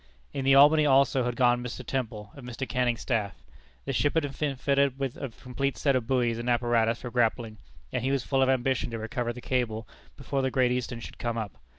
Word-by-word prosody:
In 135 -1 -3
the 135 0 +6
Albany, 150 +3 +7
also, 135 -2 +3
had 120 -1 -2
gone 120 -1 +3
Mr. 125 +1 -6
Temple, 110 -5 -4
of 140 - -12
Mr. 125 +2 -5
Canning's 125 -2 0
staff. 110 -6 -1 0.5
The - - -2
ship 145 +4 +1
had 160 - +3 0.2
been 145 -3 0
fitted 140 +1 +2
up - - -24
with 135 -3 -3
a 140 - -5
complete 125 +4 -4
set 140 -2 +2
of 120 -3 -1
buoys 120 -3 +1
and 120 +1 -3
apparatus 120 -1 +2
for 125 - -6
grappling; 115 -2 0 0.3
and - - -1
he 130 - 0
was 135 -2 0
full 135 -1 +1
of 130 - +3
ambition 130 -1 +1
to 115 - -4
recover 120 +2 -3
the 120 +1 -9
cable 115 -4 -2 0.3
before 140 0 -2
the 130 - +1
Great 130 -1 +2
Eastern 125 -1 -3
should - - -10
come 120 -1 -2
up. 110 -4 -3
125 Hz, 230 wpm, -27 LUFS, 120-135 Hz, 0.5 s, Albany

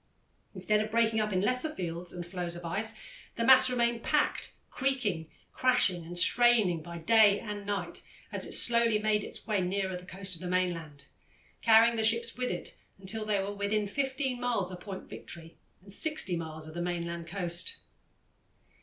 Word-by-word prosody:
Instead 210 +3 +1
of 215 - -6
breaking 225 0 +2
up 215 0 -1
in 185 -1 +1
lesser 250 +8 +3
fields 175 -1 -4
and 175 -1 -6
floes 175 -1 -4
of 175 0 -8
ice, 215 +6 0 0.4
the 230 - -2
mass 260 0 +8
remained 235 -2 0
packed, 300 +3 0 0.2
creaking, 220 -12 -1 0.2
crashing, 245 -9 +3
and 175 +2 -7
straining 220 -5 +4
by 170 +2 -10
night - - -1 0.3
and 205 -2 -6
day 205 -1 -3 0.3
as - - -1
it - - -4
slowly 235 -2 +5
made 210 -1 +1
its - - -7
way 210 -3 0
nearer 190 +1 -2
the 180 0 -9
coast 190 0 -6
of 165 - -6
the 180 - -5
mainland, 165 -6 -2 0.6
carrying 230 +1 +5
the 220 - 0
ships 230 +1 +2
with 250 0 -2
it 175 - -4 0.2
until 195 +3 -3
they 210 -1 +1
were 195 +1 -3
within 205 +1 -1
15 265 +2 -2
miles 230 -7 -1
of 180 - -8
Point 190 0 -7
Victory, 165 -1 -9 0.3
and 195 0 -9
60 305 - +1
miles 160 -1 -6
of 155 - -10
the 175 - -4
mainland 170 -1 -4
coast. 175 - -4
200 Hz, 180 wpm, -30 LUFS, 175-230 Hz, 0.6 s, mass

